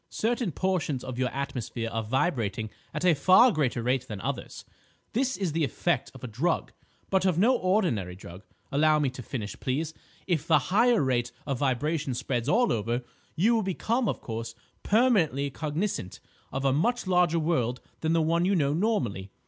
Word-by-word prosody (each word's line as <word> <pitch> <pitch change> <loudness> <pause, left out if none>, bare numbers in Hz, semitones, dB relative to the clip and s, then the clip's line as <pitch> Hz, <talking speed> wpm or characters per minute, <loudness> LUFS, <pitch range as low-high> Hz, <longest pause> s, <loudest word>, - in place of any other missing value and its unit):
Certain 235 -3 -1
portions 170 -8 -1
of 130 -1 -6
your 130 -1 +1
atmosphere 125 -4 -4
are 115 - -1
vibrating 110 - -1 0.2
at 155 +4 -3
a 180 - +6
far 185 - +6
greater 130 - 0
rate 130 +1 0
than 105 -2 -6
others. - - -5 0.5
This 265 +3 0
is 190 -5 -1
the 160 +1 0
effect 135 - 0
of - - -12
a - - -3
drug, 140 +10 -1 0.4
but 190 -1 +3
of 185 -4 +2
no 235 +8 +4
ordinary 180 - 0
drug. 90 0 -11 0.3
Allow 155 +2 +4
me 145 -4 +1
to 130 - -8
finish, 105 -4 -6
please. 150 +5 -2 0.3
If 165 -4 -1
the - - +6 0.2
higher 230 -2 +4
rate 120 -2 0
of 135 -3 -2
vibration 145 +1 0
spreads 125 0 -2
all 240 +5 +3
over, 115 +3 -1 0.3
you 205 +9 +3
will 225 - +2
become, 220 +4 0
of - - -3
course, 115 0 -5 0.3
permanently 180 - +2
cognisant 155 - -3 0.3
of 135 +1 -3
a 135 - +3
much 240 - +1
larger 180 -2 +3
world 130 -7 0 0.2
than 160 0 0
the 165 -1 +3
one 165 +2 +2
you 195 +2 +2
know 145 -4 +2
normally. 140 - -1
150 Hz, 180 wpm, -27 LUFS, 125-185 Hz, 0.5 s, a